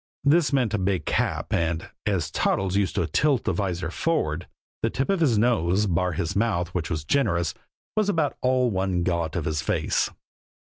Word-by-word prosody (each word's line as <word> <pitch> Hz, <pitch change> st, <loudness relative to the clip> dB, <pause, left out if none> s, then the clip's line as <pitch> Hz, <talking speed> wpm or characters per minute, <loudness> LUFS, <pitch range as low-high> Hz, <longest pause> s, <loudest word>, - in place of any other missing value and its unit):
This 150 Hz, +2 st, +4 dB
meant 125 Hz, -6 st, +1 dB
a 105 Hz, -, +1 dB
big 95 Hz, -4 st, 0 dB
cap, -, -, -1 dB
and, 85 Hz, -1 st, 0 dB, 0.2 s
as -, -, 0 dB
Toddles 95 Hz, 0 st, 0 dB
used 100 Hz, -5 st, +1 dB
to -, -, +1 dB
tilt 135 Hz, -, +2 dB
the -, -, 0 dB
vizor 90 Hz, -4 st, -2 dB
forward, 90 Hz, -, -1 dB, 0.3 s
the -, -, +1 dB
tip 135 Hz, +8 st, -1 dB
of 195 Hz, -, +1 dB
his 135 Hz, -9 st, +3 dB
nose, 105 Hz, -4 st, +2 dB
bar 90 Hz, -1 st, 0 dB
his 80 Hz, +1 st, -2 dB
mouth 100 Hz, -5 st, +1 dB
which 85 Hz, -2 st, -3 dB
was 80 Hz, -3 st, -2 dB
generous, 85 Hz, -, +1 dB, 0.4 s
was 215 Hz, -1 st, +2 dB
about 160 Hz, -7 st, +1 dB
all 130 Hz, -1 st, +2 dB
one 95 Hz, -2 st, 0 dB
got 85 Hz, -3 st, -1 dB
of 85 Hz, -4 st, -2 dB
his 80 Hz, -1 st, -1 dB
face. 80 Hz, -2 st, 0 dB
95 Hz, 185 wpm, -25 LUFS, 85-125 Hz, 0.4 s, This